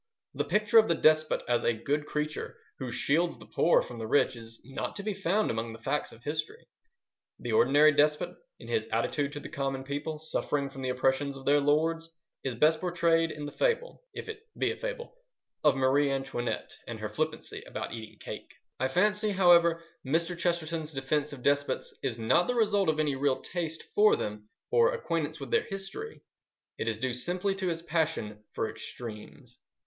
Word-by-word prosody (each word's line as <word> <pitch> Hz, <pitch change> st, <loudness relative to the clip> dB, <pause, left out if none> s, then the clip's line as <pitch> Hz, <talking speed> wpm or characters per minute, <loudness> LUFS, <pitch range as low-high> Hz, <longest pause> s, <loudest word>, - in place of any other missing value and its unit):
The -, -, -1 dB
picture 215 Hz, +2 st, +5 dB
of 220 Hz, -, +4 dB
the 170 Hz, -, +3 dB
despot 155 Hz, 0 st, +3 dB
as 120 Hz, 0 st, +2 dB
a 120 Hz, -, +2 dB
good 145 Hz, +6 st, -1 dB
creature 150 Hz, 0 st, -3 dB, 0.2 s
who 130 Hz, -3 st, -4 dB
shields 160 Hz, +8 st, +1 dB
the -, -, -13 dB
poor 170 Hz, -, +3 dB
from 120 Hz, -1 st, -9 dB
the 110 Hz, -, -4 dB
rich 135 Hz, +1 st, +3 dB
is 115 Hz, 0 st, -11 dB
not 135 Hz, -, -4 dB
to 200 Hz, -, -5 dB
be 210 Hz, 0 st, -1 dB
found 195 Hz, +2 st, +1 dB
among 115 Hz, 0 st, -3 dB
the -, -, -9 dB
facts 145 Hz, +6 st, -1 dB
of 115 Hz, -, -15 dB
history. 155 Hz, -, -3 dB, 0.7 s
The 120 Hz, -, -5 dB
ordinary 145 Hz, +7 st, +6 dB
despot, 150 Hz, +1 st, +2 dB, 0.2 s
in -, -, -11 dB
his 455 Hz, -, 0 dB
attitude 145 Hz, -1 st, 0 dB
to 145 Hz, -, -5 dB
the -, -, -8 dB
common 135 Hz, -3 st, -3 dB
people 145 Hz, +3 st, -3 dB
suffering 145 Hz, -2 st, -2 dB
from 135 Hz, -, -8 dB
the 130 Hz, -, -2 dB
oppressions 135 Hz, +2 st, +1 dB
of 135 Hz, -, -11 dB
their 145 Hz, +1 st, +5 dB
lords, 160 Hz, +3 st, +1 dB, 0.3 s
is 130 Hz, -3 st, -2 dB
best 155 Hz, +6 st, +4 dB
portrayed 170 Hz, -2 st, +2 dB
in 150 Hz, -2 st, -6 dB
the 145 Hz, -, -5 dB
fable—if -, -, -2 dB
it 445 Hz, -1 st, -6 dB, 0.2 s
be -, -, +1 dB
a -, -, -4 dB
fable—of -, -, -3 dB
Marie 135 Hz, +2 st, +3 dB
Antoinette 135 Hz, -3 st, -3 dB
and 115 Hz, -2 st, -5 dB
her 110 Hz, -, -3 dB
flippancy 155 Hz, +8 st, -3 dB
about -, -, -5 dB
eating 110 Hz, -2 st, -8 dB
cake. -, -, -8 dB, 0.2 s
I 130 Hz, -, +2 dB
fancy, 210 Hz, +8 st, +2 dB
however, 170 Hz, -3 st, +5 dB, 0.2 s
Mr. 165 Hz, +6 st, 0 dB
Chesterton's 170 Hz, -2 st, -1 dB
defence 145 Hz, +2 st, -1 dB
of 135 Hz, -4 st, -9 dB
despots 140 Hz, 0 st, +1 dB
is 125 Hz, -4 st, -2 dB
not 115 Hz, +10 st, +3 dB
the 250 Hz, -, 0 dB
result 205 Hz, -5 st, +3 dB
of 155 Hz, 0 st, +1 dB
any 150 Hz, -3 st, +1 dB
real 135 Hz, -1 st, +1 dB
taste 165 Hz, -3 st, -4 dB
for 210 Hz, +1 st, +6 dB
them 105 Hz, 0 st, -5 dB, 0.2 s
or 475 Hz, +1 st, +5 dB
acquaintance 165 Hz, -, -2 dB
with 135 Hz, -3 st, -7 dB
their -, -, +4 dB
history: 195 Hz, -, -7 dB, 0.6 s
it -, -, -2 dB
is 115 Hz, -1 st, 0 dB
due 130 Hz, +2 st, -1 dB
simply 180 Hz, +10 st, -1 dB
to 190 Hz, -1 st, -3 dB
his 165 Hz, -1 st, -2 dB
passion 155 Hz, -11 st, -1 dB
for -, -, -1 dB
extremes. 110 Hz, -3 st, -9 dB
150 Hz, 185 wpm, -29 LUFS, 135-175 Hz, 0.7 s, ordinary